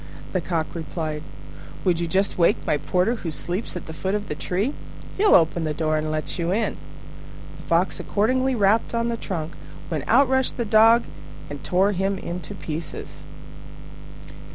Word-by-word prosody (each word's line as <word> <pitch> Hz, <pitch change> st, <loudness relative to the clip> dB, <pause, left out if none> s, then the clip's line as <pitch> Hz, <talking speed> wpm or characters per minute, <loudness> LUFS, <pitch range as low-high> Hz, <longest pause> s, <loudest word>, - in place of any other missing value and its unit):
The 185 Hz, -, 0 dB
Cock 165 Hz, -2 st, -1 dB
replied, 155 Hz, -2 st, -4 dB, 0.6 s
"Would 175 Hz, -3 st, +3 dB
you 170 Hz, -, -1 dB
just 190 Hz, +4 st, +1 dB
wake 170 Hz, -1 st, +2 dB
my 150 Hz, -, +2 dB
porter 185 Hz, +10 st, +1 dB
who 175 Hz, -, -4 dB
sleeps 175 Hz, +7 st, -3 dB
at 180 Hz, -, -5 dB
the 160 Hz, -, -7 dB
foot 190 Hz, +5 st, -2 dB
of 210 Hz, 0 st, -3 dB
the -, -, -1 dB
tree? 195 Hz, -, -1 dB, 0.4 s
He'll 410 Hz, +1 st, +5 dB
open 165 Hz, 0 st, +3 dB
the 155 Hz, -1 st, -1 dB
door 155 Hz, 0 st, 0 dB
and 155 Hz, 0 st, -1 dB
let 155 Hz, +3 st, -3 dB
you 170 Hz, +1 st, 0 dB
in." 215 Hz, +3 st, 0 dB, 0.8 s
The -, -, -11 dB
Fox 170 Hz, +3 st, +1 dB
accordingly 255 Hz, +5 st, +1 dB
rapped 215 Hz, +2 st, +2 dB
on 230 Hz, 0 st, +1 dB
the 235 Hz, -, 0 dB
trunk, 165 Hz, -7 st, -4 dB, 0.4 s
when 155 Hz, -5 st, -2 dB
out 270 Hz, +4 st, +5 dB
rushed 265 Hz, 0 st, +1 dB
the 235 Hz, -, -1 dB
Dog 225 Hz, +2 st, +6 dB, 0.5 s
and 145 Hz, -1 st, -7 dB
tore 190 Hz, +3 st, +3 dB
him 195 Hz, 0 st, 0 dB
in 175 Hz, -1 st, -5 dB
pieces. 165 Hz, -3 st, -6 dB
185 Hz, 175 wpm, -24 LUFS, 160-220 Hz, 0.8 s, Dog